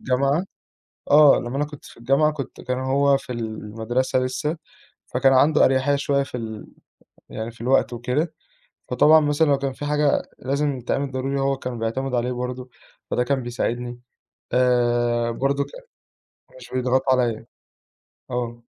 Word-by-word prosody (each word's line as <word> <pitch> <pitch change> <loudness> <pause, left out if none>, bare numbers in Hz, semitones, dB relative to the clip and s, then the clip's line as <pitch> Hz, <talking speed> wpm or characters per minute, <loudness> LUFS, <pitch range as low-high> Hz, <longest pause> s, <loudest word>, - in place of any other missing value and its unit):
الجامعة، 140 +6 +1 0.7
آه، 150 -1 +7
لمّا 120 +3 -4
أنا 145 - +1
كنت 145 -1 -12
في - - -14
الجامعة 135 +6 +2
كنت 145 -3 -7
كان 125 0 -2
هو 140 +1 +3
في 125 - -8
المدرسة 115 +3 -2
لسّه، 150 +5 -2 0.5
فكان 135 -1 +3
عنده 150 +3 +5
أريحية 130 +2 +2
شوية 140 0 +1
في 130 -2 -7
ال 110 -2 -7 0.6
يعني 110 +1 -5
في 115 - -19
الوقت 125 +1 +2
وكده، 125 +7 -2 0.6
فطبعًا 155 +1 +6
مثلًا 145 +1 +2
لو 140 -1 +3
كان 135 -1 -3
في 145 - -7
حاجة 150 0 +2 0.2
لازم 140 0 -1
تتعمل 135 +3 -2
ضروري 135 +1 -2
هو 135 0 +1
كانوا 125 -2 -5
بيعتمدوا 125 +3 -2
عليه 120 +1 -1
برضه، 125 +1 -5 0.4
فده 125 - +2
كان 130 0 -1
بيساعدني، 120 0 -3 0.5
آآ 120 -1 +2
برضه 140 +4 0
ك - - -14 0.9
مش - - -13
بيضغطوا 130 +1 +2
عليَّ. 120 -3 0 0.9
آه. 120 -1 -4
130 Hz, 150 wpm, -23 LUFS, 120-140 Hz, 0.9 s, آه